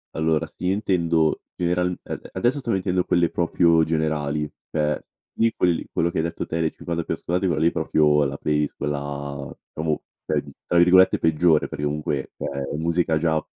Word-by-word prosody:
Allora 80 -1 +1
sì, 90 +1 -3
intendo 85 -6 +1 0.2
general 90 +1 +1
ade - - -7
adesso 125 +4 +1
sto 120 -4 -3
mettendo 90 -1 +1
quelle 85 -1 +2
proprio 85 -1 +3
generali, 75 -2 -1 0.2
cioè 75 -1 +1
s - - -31 0.3
lì 115 0 +3
quelli 90 -2 +1
quello 85 - +1
che - - -2
hai 80 - +1
detto 85 - -3
te, 85 - -2
le 80 -1 +1
50 85 -1 -4
più - - -2
ascoltate, 90 +3 -1
quelle 80 -3 0
lì - - +6
proprio, 75 -1 +3
la 70 +1 -2
playlist 75 -1 0
quella 70 -1 -4 0.2
diciamo 80 -1 -2 0.2
cioè - - 0
di - - -13
tra 85 - +1
virgolette 90 +2 +6
“peggiore” 80 0 +3
perché 75 - -6
comunque, 75 -2 -2
cioè 70 0 -4
è - - -3
musica 80 0 +1
già 80 -1 0
80 Hz, 185 wpm, -23 LUFS, 75-85 Hz, 0.3 s, lì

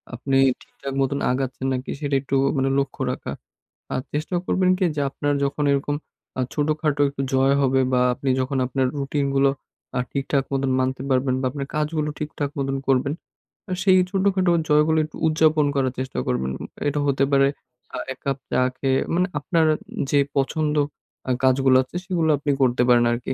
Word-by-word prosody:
আপনি 135 +2 0 0.2
ঠিকঠাক 135 - -8
মত 135 0 +1 0.2
আগাচ্ছেন 130 0 -3
নাকি 130 0 -4
সেটা 145 -2 -1
একটু 140 0 -2 0.2
মানে 135 0 +1
লক্ষ্য 135 -1 -3
রাখা। - - -5 0.6
আর 130 - -1
চেষ্টা 155 +5 -2
করবেন 185 -1 +2
কি 185 - +1
যে 145 - 0
আপনার 145 +1 -1
যখন 145 +2 -2
এরকম 145 +1 -1 0.4
আ - - +2
ছোটখাটো 150 -1 0
একটু 140 -1 -5
জয় 135 +1 +4
হবে 135 0 +3
বা 125 - +3
আপনি 135 +2 -3
যখন 130 +1 -1
আপনার 130 +1 0
রুটিন 140 +1 -1
গুলো 135 0 +4 0.5
আ - - +2
ঠিকঠাক 140 0 0
মত 135 0 0 0.2
মানতে 130 0 -1
পারবেন 130 0 +2
বা 130 - -1
আপনার 140 0 -5
কাজগুলো 150 0 -1
ঠিকঠাক 150 -1 -3
মত 135 - -1 0.2
করবেন। 135 +2 +2 0.7
সেই 190 -1 +5
ছোটখাটো 190 -2 +2 0.2
জয়গুলি 150 +1 +4 0.3
উদযাপন 155 -1 +3
করার 130 -2 +1
চেষ্টা 130 - -3
করবেন। 65 +1 -1 0.4
এটা 145 +1 0
হতে 135 0 +2
পারে 135 0 +5 0.5
আ - - -3 0.2
এক - - -23
কাপ 135 -1 0
চা - - +2 0.2
খেয়ে 135 -1 +1
মানে 180 +2 +2
আপনার 160 +2 +1 0.4
যে 145 - +3
আ - - -43
পছন্দ 150 +2 0 0.7
কাজগুলো 130 0 +4
আছে 130 - -18
সেগুলো 170 -4 0
আপনি 145 +1 -1
করতে 125 -1 +3
পারেন 120 -1 +5
আরকি। 120 +2 -2
140 Hz, 170 wpm, -23 LUFS, 130-150 Hz, 0.7 s, সেই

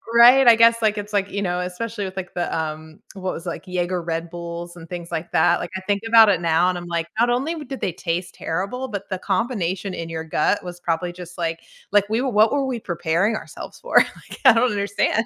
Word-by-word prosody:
Right? 245 +2 +8
I 230 - +9
guess, 230 0 +5
like, 215 -1 +2
it's 205 +1 -6
like, 200 -1 +1
you 200 - -2
know 180 -1 -1
especially 205 +3 -4
with, 190 0 -8
like, 185 -2 -5
the, 175 - -2
um, 155 0 -5 0.2
what 185 -1 -3
was 165 - -8
like, 170 +2 -5
Jäger 180 -1 -2
Red 165 0 -3
Bulls 170 0 -7
and 165 -1 -12
things 175 -1 -7
like 165 +1 -4
that, 170 +2 +3
like, 175 - -5
I - - -7
think 200 +1 -1
about 225 -1 +8
it 180 -3 +2
now 165 +2 +3
and 180 - -2
I'm 175 0 -7
like, 170 -1 -1
not 240 +1 +4
only 275 +7 0
did 270 +1 -7
they 185 - 0
taste 175 0 -3
terrible, 200 +10 -3
but 200 -2 -6
the 190 -1 -3
combination 195 -3 -1
in 165 0 -5
your 160 0 -4
gut 160 +5 +1
was 175 0 -8
probably 175 +1 -1
just 180 0 -10
like 165 -1 -2 0.3
like, 205 -1 +3
we 225 +2 +1
what 220 -4 +3
were 280 -1 +1
we 250 -3 -3
preparing 175 +4 0
ourselves - - -8
for? - - 0
Like, - - +1
I 255 - +9
don't 235 0 +2
understand. 205 +2 0
185 Hz, 235 wpm, -22 LUFS, 170-220 Hz, 0.3 s, I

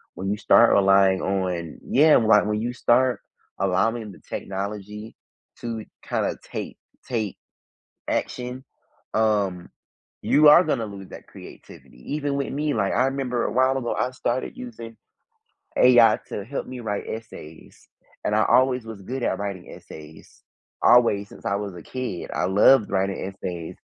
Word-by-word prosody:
when 95 - -4
you 105 - -1
start 115 +2 +5
relying 95 -1 +4
on 90 -4 -3
Yeah, 150 +3 +5
why 110 -2 +5
When 105 0 -1
you 120 +2 -2
start 125 +1 +2 0.4
allowing 100 +4 0
the - - -16
technology 105 +2 -6 0.4
to 115 -2 -5 0.2
kinda - - -1
take - - -7 0.3
take 110 -5 -3 0.7
action, 125 +1 -3 0.5
um, 100 -5 0 0.5
you 150 0 +5
are 170 +4 +8
gonna 115 -4 -1
lose 100 -2 -10
that - - -12
creativity. 60 - -12
Even 145 -2 -2
with 140 0 -2
me, 150 +1 -1
like, 100 -3 0
I 125 +5 +2
remember 135 -3 -2
a - - -2
while 130 +2 +2
ago, 120 -3 -2
I 125 - -1
started 130 0 -3
using 115 -2 -9 0.8
AI 120 -3 +6
to 100 - -5
help 135 +6 -5
me 125 -1 -8
write 105 -3 -3
essays, 105 -8 -10 0.4
and 105 - 0
I 110 - +3
always 130 -2 +3
was 110 -3 -9
good 125 +6 -5
at - - -1
writing 100 -3 -6
essays. 80 0 -13 0.4
Always, 110 -5 +4
since - - -15
I 100 - +1
was 100 -2 -5
a 85 - -10
kid. 125 -9 -5
I 90 - 0
loved 105 +4 +4
writing 95 0 -1
essays. 90 -4 -7
110 Hz, 155 wpm, -24 LUFS, 100-125 Hz, 0.8 s, are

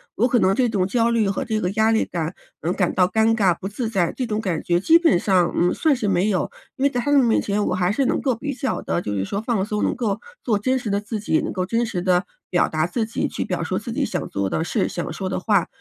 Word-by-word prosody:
我 240 +5 +3
可 245 - +2
能 190 +1 +3
这 250 +3 +2
种 200 -5 0
焦 230 +4 +1
虑 225 -4 +2
和 195 - -2
这 220 -1 -1
个 180 +1 0
压 220 +2 +2
力 220 - +3
感， 170 0 -4 0.2
嗯， 170 +3 -1
感 180 -3 0
到 180 -1 +3
尴 220 +3 +2
尬 190 -6 +3
不 195 - -5
自 225 +3 -3
在， 180 -6 +1
这 255 - -3
种 215 -1 -1
感 180 -7 -2
觉 175 0 +1
基 325 - +5
本 325 - +4
上， 180 -2 +2
嗯， 175 +1 +3
算 310 -4 +2
是 215 -5 -1
没 185 +2 +2
有。 190 -4 0 0.2
因 275 - -3
为 280 - +5
在 245 - -2
他 290 +4 0
们 280 - +6
面 230 -2 +3
前 205 0 -1
我 - - 0
还 180 0 +1
是 275 - +1
能 - - +1
够 260 -3 +1
比 280 +5 -4
较 260 +1 -2
地 - - -1
就 105 - -4
是 95 - -1
说 200 - -3
放 225 -3 0
松， 210 +1 -2
能 - - 0
够 225 -5 -1 0.2
做 215 -4 +1
真 260 +4 +1
实 240 -4 -4
的 200 0 +1
自 215 +1 -5
己， 200 -6 +1
能 - - -3
够 185 -1 -1
真 230 +4 0
实 195 -6 -3
地 180 0 +2 0.2
表 175 - +2
达 155 0 0
自 220 +6 -1
己 225 - -2
去 - - -3
表 - - -2
述 - - -2
自 - - -6
己 - - 0
想 - - -2
做 100 -1 -2
的 160 - -1
事、 - - 0
想 175 - -4
说 190 -1 -4
的 185 - -2
话。 200 -3 +2
205 Hz, 315 characters per minute, -22 LUFS, 180-235 Hz, 0.2 s, 们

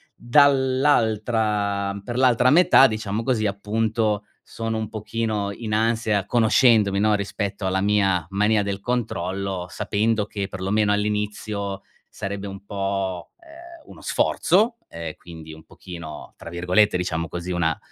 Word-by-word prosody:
Dall'altra 110 -7 +2
per 120 +3 -6
l'altra 125 -1 +4
metà 160 -4 +6
diciamo 110 -1 -3
così 115 -3 0
appunto, 105 +1 -1 0.2
sono 115 0 -4
un 110 -1 -3
pochino 110 -1 -3
in 110 +1 -5
ansia 110 -2 +1
conoscendomi, 110 -3 +3
no, 105 +1 +3
rispetto 100 0 -4
alla 95 0 0
mia 95 -4 +2
mania 105 +2 +2
del 100 -1 -3
controllo, 100 -5 -3
sapendo 110 +3 0
che 100 -1 -4
perlomeno 100 +2 0
all'inizio, 105 -1 -2 0.3
sarebbe 100 0 -5
un 100 0 -9
po', 95 -2 -3
ehm, 340 0 -14
uno - - -13
sforzo, 225 +6 +2
uhm, 85 -1 -6
quindi 80 -2 -11
un 80 0 -13
pochino 85 -4 -10
tra - - -9
virgolette 90 +4 +2
diciamo 85 -2 -2
così, 85 +3 -5
una 80 -3 0
105 Hz, 130 wpm, -23 LUFS, 95-115 Hz, 0.3 s, metà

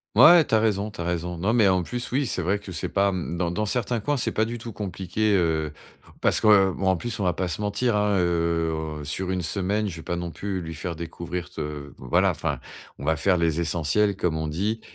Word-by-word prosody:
Ouais, 170 +1 +9
tu - - -5
as 110 - +6
raison, 105 -1 0
tu 105 - -14
as 85 - -2
raison. 85 0 -2
Non, 100 +6 0
mais, 110 -5 +5
en 90 -1 +2
plus, 120 +6 -5
oui, 140 +2 +1
c'est 110 - -2
vrai 95 +4 0
que 95 -3 -9
c'est - - -3
pas, 100 0 +2
mmh, 85 -1 -3
dans 85 -1 0
dans 105 +5 -1
certains 120 +1 -1
coins, 145 +6 0
c'est 125 - -1
pas 110 - +2
du 115 +2 -3
tout 115 -1 -8
compliqué, 100 +1 -1
heu 80 -3 0 0.5
parce - - +2
que 100 -3 +6
bon 95 - -2
en 95 -2 +3
plus, 115 +4 -3
on - - +1
va 90 - +3
pas 90 +2 -2
se 90 - -3
mentir, 105 +3 0
hein, 105 -1 +2
heu, 85 -3 0
sur 90 +6 -3
une 90 -1 -1
semaine, 100 +4 -1
je 85 - -5
vais 80 - -9
pas 85 - -3
non 85 0 -3
plus 95 +2 -4
lui 80 0 -6
faire 85 0 -5
découvrir 85 +1 -5
te 75 -2 -6
voilà, 65 -1 +2
enfin, - - -3 0.4
on - - -6
va 80 +2 +2
faire 90 +4 +2
les 85 0 +1
essentiels, 85 +5 +1
comme 85 -4 0
on 80 0 -2
dit 105 +8 -2
95 Hz, 250 wpm, -25 LUFS, 85-105 Hz, 0.5 s, Ouais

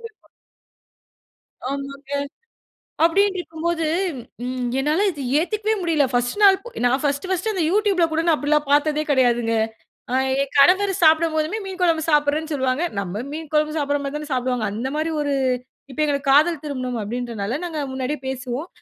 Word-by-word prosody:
வப்பா - - -29 1.4
ஆமாங்க. 275 0 -6 0.9
அப்டின்ட்ருக்கும்போது, 340 -2 +1 0.6
ம் 250 -1 -2
என்னால 305 +9 +1
இத 295 -5 -8 0.2
ஏத்துக்கவே 430 +5 0
முடியல! 325 -4 +2
ஃபர்ஸ்ட் 245 +5 0
நாள் 390 -1 +7
பொ - - -10 0.2
நான் 260 +2 +2
ஃபர்ஸ்ட்டு 285 +5 -1
ஃபர்ஸ்ட்டு 380 +4 0
அந்த 370 -4 0
யூடியூப்ல 400 -4 +3
கூட 320 +1 +1
நான் 330 - +5
அப்டிலாம் 295 0 +1
பாத்ததே 300 +1 +3
கெடையாதுங்க. 240 -4 +2 0.6
அ - - +1 0.3
என் 275 - -3
கணவர் 380 +7 +5
சாப்டும்போதுமே, 315 +3 +3
மீன் 380 -1 -7
கொழம்பு 330 -3 +2
சாப்ட்றேன்னு 300 +1 +1
சொல்லுவாங்க. 260 +2 0 0.2
நம்ம 200 +3 -4
மீன் 315 0 -6
குழம்பு 305 0 +1
சாப்ட்ற 290 -1 0
மாரி 280 +1 -4
தானே 300 0 -8
சாப்டுவாங்க. 250 -2 -1
அந்த 235 +5 -3
மாரி 315 +1 -1
ஒரு 285 -1 -1 0.6
இப்ப 260 - -9
எங்களுக்கு 280 -2 -1
காதல் 305 +2 +4
திருமணம் 255 -5 -3
அப்படின்றதுனால, 230 +1 -3
நாங்க 325 -3 -4
முன்னாடியே 265 +3 -3
பேசுவோம். 265 +3 -4
295 Hz, 150 wpm, -22 LUFS, 260-330 Hz, 1.4 s, நாள்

